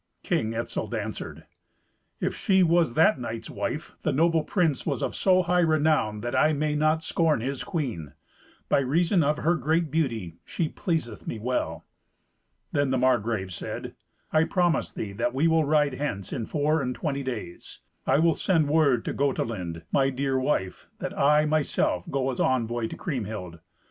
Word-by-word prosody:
King 110 Hz, +1 st, 0 dB
Etzel 115 Hz, -, -3 dB
answered, -, -, -5 dB, 0.7 s
"If -, -, -1 dB
she 190 Hz, -1 st, +3 dB
was 165 Hz, -6 st, +3 dB
that 160 Hz, +1 st, +4 dB
knight's 115 Hz, -1 st, -5 dB
wife, 155 Hz, +3 st, -4 dB
the 155 Hz, -, 0 dB
noble 160 Hz, +3 st, +2 dB
prince 165 Hz, -4 st, 0 dB
was -, -, -2 dB
of -, -, -2 dB
so 185 Hz, -1 st, +3 dB
high 180 Hz, 0 st, +2 dB
renown, 155 Hz, -10 st, +2 dB
that 120 Hz, +2 st, -3 dB
I 155 Hz, -, +4 dB
may 150 Hz, +1 st, 0 dB
not 155 Hz, +2 st, +2 dB
scorn 160 Hz, -4 st, +1 dB
his 135 Hz, +2 st, -3 dB
queen. 120 Hz, -, -4 dB, 0.5 s
By -, -, +3 dB
reason 165 Hz, +7 st, +2 dB
of 150 Hz, 0 st, +1 dB
her 165 Hz, +3 st, +2 dB
great 160 Hz, +1 st, 0 dB
beauty 115 Hz, -, -1 dB
she 160 Hz, -3 st, -2 dB
pleaseth 155 Hz, -, -3 dB
me -, -, -3 dB
well." 125 Hz, +4 st, -2 dB, 0.9 s
Then 145 Hz, -1 st, +1 dB
the 130 Hz, -, +1 dB
Margrave 115 Hz, -7 st, +1 dB
said, 85 Hz, -, -6 dB, 0.4 s
"I 155 Hz, 0 st, +5 dB
promise 175 Hz, -1 st, +1 dB
thee 105 Hz, -, -5 dB
that 120 Hz, +5 st, -2 dB
we 150 Hz, +5 st, +3 dB
will 160 Hz, -1 st, +3 dB
ride 145 Hz, -1 st, +2 dB
hence 115 Hz, -9 st, -4 dB
in 115 Hz, -, -3 dB
four 150 Hz, +1 st, +1 dB
and 125 Hz, -2 st, -2 dB
twenty 140 Hz, -3 st, -2 dB
days. 120 Hz, -10 st, -7 dB, 0.3 s
I -, -, +4 dB
will 165 Hz, +2 st, +4 dB
send 160 Hz, -5 st, +1 dB
word 145 Hz, -6 st, +3 dB
to -, -, -2 dB
Gotelind, 105 Hz, -, -2 dB
my 135 Hz, -1 st, +3 dB
dear 135 Hz, 0 st, -1 dB
wife, 130 Hz, -9 st, -1 dB
that -, -, -5 dB
I, 150 Hz, +2 st, +4 dB
myself, 150 Hz, -, 0 dB
go 135 Hz, -1 st, 0 dB
as 125 Hz, -, -6 dB
envoy 120 Hz, -2 st, +1 dB
to -, -, -8 dB
Kriemhild." 105 Hz, -, -5 dB
140 Hz, 170 wpm, -26 LUFS, 115-160 Hz, 0.9 s, I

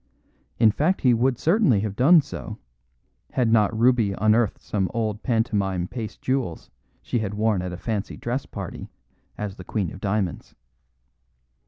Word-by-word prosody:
In 110 Hz, -2 st, +5 dB
fact 160 Hz, -, 0 dB
he 125 Hz, -2 st, +4 dB
would 125 Hz, +2 st, +2 dB
certainly 160 Hz, -, +3 dB
have 105 Hz, -2 st, -3 dB
done 155 Hz, +8 st, +6 dB
so, -, -, -7 dB, 0.8 s
had 120 Hz, -3 st, +2 dB
not 110 Hz, -1 st, +3 dB
Ruby 115 Hz, -4 st, +3 dB
unearthed 110 Hz, +2 st, +2 dB
some 95 Hz, -3 st, -2 dB
old 110 Hz, -2 st, -1 dB
pantomime 100 Hz, -7 st, 0 dB
paste 115 Hz, -1 st, -7 dB
jewels 130 Hz, -11 st, -2 dB, 0.3 s
she 120 Hz, -, -1 dB
had 105 Hz, -2 st, -3 dB
worn 105 Hz, -3 st, +1 dB
at 90 Hz, 0 st, -4 dB
a 90 Hz, -, -6 dB
fancy 105 Hz, +1 st, -3 dB
dress 125 Hz, +3 st, -3 dB
party -, -, -7 dB, 0.5 s
as 105 Hz, -2 st, -5 dB
the 90 Hz, -, -9 dB
Queen 95 Hz, -2 st, -2 dB
of 95 Hz, -, -11 dB
Diamonds. 95 Hz, -3 st, -2 dB
110 Hz, 155 wpm, -24 LUFS, 100-125 Hz, 0.8 s, done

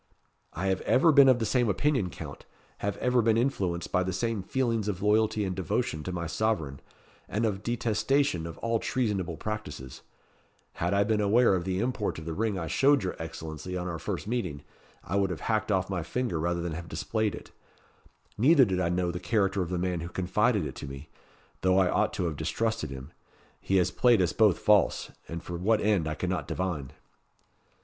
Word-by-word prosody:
"I 90 Hz, -, -3 dB
have 95 Hz, -1 st, +1 dB
ever 160 Hz, +6 st, +4 dB
been 140 Hz, -2 st, +7 dB
of 130 Hz, -, +5 dB
the 115 Hz, -, -1 dB
same 120 Hz, -1 st, +2 dB
opinion, 130 Hz, -3 st, +1 dB
Count; 75 Hz, -4 st, -9 dB, 0.3 s
have 100 Hz, 0 st, -2 dB
ever 125 Hz, -1 st, +2 dB
been 110 Hz, 0 st, +3 dB
influenced 95 Hz, -9 st, -1 dB
by 90 Hz, -, +2 dB
the 95 Hz, 0 st, -1 dB
same 110 Hz, +2 st, -1 dB
feelings 115 Hz, 0 st, -1 dB
of 95 Hz, -2 st, -3 dB
loyalty 105 Hz, 0 st, +2 dB
and 95 Hz, -1 st, -3 dB
devotion 80 Hz, -3 st, -1 dB
to 90 Hz, -, -5 dB
my 85 Hz, -1 st, -3 dB
sovereign, 80 Hz, -7 st, -1 dB, 0.5 s
and 110 Hz, +3 st, 0 dB
of 100 Hz, -3 st, -1 dB
detestation 120 Hz, -, 0 dB
of 80 Hz, -, -8 dB
all 115 Hz, 0 st, +1 dB
treasonable 105 Hz, -, -1 dB
practices. 75 Hz, -, -6 dB, 0.7 s
Had 85 Hz, +3 st, -1 dB
I 100 Hz, -, +4 dB
been 105 Hz, 0 st, +1 dB
aware 110 Hz, +2 st, +4 dB
of 90 Hz, -2 st, -1 dB
the 95 Hz, -1 st, -1 dB
import 120 Hz, 0 st, -1 dB
of 80 Hz, -, -8 dB
the 80 Hz, -, -3 dB
ring 110 Hz, +1 st, -1 dB
I 85 Hz, -, -3 dB
showed 135 Hz, -, +3 dB
your 90 Hz, -, -2 dB
Excellency 80 Hz, +2 st, -6 dB
on 90 Hz, 0 st, -3 dB
our 85 Hz, -2 st, -4 dB
first -, -, -4 dB
meeting, 95 Hz, -, -3 dB, 0.4 s
I 100 Hz, -, -2 dB
would 100 Hz, -1 st, +2 dB
have -, -, -5 dB
hacked 110 Hz, -1 st, 0 dB
off 95 Hz, -1 st, +1 dB
my 95 Hz, -3 st, -2 dB
finger 115 Hz, +1 st, -2 dB
rather 85 Hz, +2 st, -1 dB
than 85 Hz, -1 st, -3 dB
have 85 Hz, +1 st, -7 dB
displayed 105 Hz, +5 st, -1 dB
it. -, -, -12 dB, 0.9 s
Neither 140 Hz, +3 st, +6 dB
did 95 Hz, -3 st, -1 dB
I 85 Hz, -2 st, +1 dB
know 90 Hz, 0 st, 0 dB
the 90 Hz, -, -5 dB
character 95 Hz, 0 st, +1 dB
of 85 Hz, -, -2 dB
the 90 Hz, -, -1 dB
man 90 Hz, -1 st, -1 dB
who 85 Hz, +1 st, -5 dB
confided 100 Hz, +2 st, +1 dB
it -, -, -5 dB
to -, -, -6 dB
me; 70 Hz, +2 st, -9 dB, 0.5 s
though 95 Hz, 0 st, +3 dB
I 95 Hz, -1 st, +4 dB
ought -, -, +2 dB
to -, -, -2 dB
have 80 Hz, -3 st, -3 dB
distrusted 110 Hz, +2 st, -1 dB
him. 70 Hz, +2 st, -8 dB, 0.5 s
He 95 Hz, -, -1 dB
has 90 Hz, -, +2 dB
played 120 Hz, -4 st, +4 dB
us 90 Hz, -2 st, +1 dB
both 105 Hz, -6 st, +4 dB
false, 105 Hz, -1 st, +2 dB, 0.2 s
and 85 Hz, +1 st, -6 dB
for 85 Hz, -, -5 dB
what 105 Hz, +5 st, +2 dB
end 100 Hz, -7 st, +1 dB
I 80 Hz, -, -2 dB
cannot 90 Hz, +3 st, -2 dB
divine." 75 Hz, -7 st, -3 dB
95 Hz, 205 wpm, -28 LUFS, 85-110 Hz, 0.9 s, been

